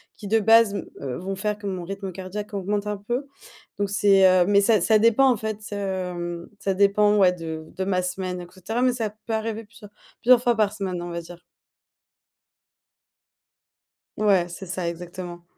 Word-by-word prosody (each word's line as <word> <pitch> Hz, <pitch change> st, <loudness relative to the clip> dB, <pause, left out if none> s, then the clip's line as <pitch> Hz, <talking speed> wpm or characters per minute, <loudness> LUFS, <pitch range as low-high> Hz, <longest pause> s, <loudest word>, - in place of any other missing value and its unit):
qui 205 Hz, -, -9 dB
de 225 Hz, +2 st, +3 dB
base 225 Hz, -1 st, +5 dB
me, -, -, -5 dB
heu, 130 Hz, -3 st, -4 dB
vont 195 Hz, +2 st, -4 dB
faire 210 Hz, +1 st, -2 dB
que 205 Hz, -1 st, -7 dB
mon 185 Hz, -2 st, -3 dB
rythme 195 Hz, +1 st, -6 dB
cardiaque 205 Hz, +3 st, -6 dB
augmente 205 Hz, +1 st, -2 dB
un 210 Hz, -1 st, -2 dB
peu. 240 Hz, +7 st, -3 dB, 0.5 s
Donc 200 Hz, -1 st, -1 dB
c'est, 200 Hz, -1 st, +4 dB
heu. 185 Hz, -1 st, +5 dB
Mais 200 Hz, 0 st, +5 dB
ça 215 Hz, 0 st, +4 dB
ça 220 Hz, +3 st, +4 dB
dépend, 230 Hz, +5 st, +4 dB
en -, -, +2 dB
fait, 215 Hz, 0 st, -4 dB
heu, 180 Hz, -3 st, -4 dB
ça 195 Hz, -1 st, 0 dB
dépend, 205 Hz, +2 st, +3 dB
ouais 185 Hz, -2 st, +5 dB
de 160 Hz, -2 st, -6 dB
de 190 Hz, -, -2 dB
ma 185 Hz, -1 st, 0 dB
semaine 180 Hz, 0 st, -3 dB
et 175 Hz, -, -9 dB
cetera. 200 Hz, +6 st, -4 dB
Mais 255 Hz, -1 st, +3 dB
ça 225 Hz, -4 st, -2 dB, 0.2 s
peut 225 Hz, -, -2 dB
arriver 220 Hz, 0 st, -3 dB
plusieurs 205 Hz, -1 st, -15 dB, 0.3 s
plusieurs 245 Hz, 0 st, +6 dB
fois 240 Hz, -1 st, +2 dB
par 210 Hz, -2 st, +2 dB
semaine, 185 Hz, -4 st, -4 dB
on 175 Hz, -, -6 dB
va 170 Hz, -, -3 dB
dire. 175 Hz, +1 st, -13 dB, 2.7 s
Ouais, 195 Hz, -5 st, +3 dB
c'est 190 Hz, +3 st, -8 dB
ça, 180 Hz, -1 st, -3 dB
exactement. 175 Hz, 0 st, -8 dB
200 Hz, 190 wpm, -24 LUFS, 180-215 Hz, 2.7 s, plusieurs